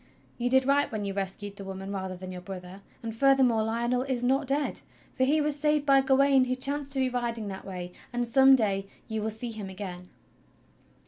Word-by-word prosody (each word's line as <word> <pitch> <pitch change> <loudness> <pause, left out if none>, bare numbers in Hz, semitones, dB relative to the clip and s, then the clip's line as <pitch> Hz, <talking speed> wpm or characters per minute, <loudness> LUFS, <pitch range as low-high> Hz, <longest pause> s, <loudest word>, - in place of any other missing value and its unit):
You 245 +1 0
did 265 0 +4
right 285 +1 +2
when 215 -2 -3
you 195 - -3
rescued 200 +1 -4
the 200 - -7
woman 195 0 -6
rather 190 -2 -4
than 185 +1 -8
your 180 -1 -7
brother, 185 0 -9 0.2
and 225 -1 -5
furthermore 260 -3 +4
Lionel 235 +3 0
is 260 -2 -1
not 270 +3 +1
dead, 280 +2 0 0.3
for 260 - +1
he 300 +4 +3
was 300 -1 0
saved 300 0 +2
by 275 -1 +5
Gawain 270 0 +4
who 255 0 -1
chanced 280 +2 +1
to 270 - +2
be 260 - +2
riding 235 -4 -3
that 190 -1 -7
way; 180 -2 -6 0.2
and 240 0 -1
some 270 +2 +7
day 195 -5 0 0.2
you 220 -1 -3
will 220 - -1
see 220 +2 -5
him 210 -3 -6
again." 185 -2 -7
235 Hz, 210 wpm, -28 LUFS, 195-270 Hz, 0.3 s, some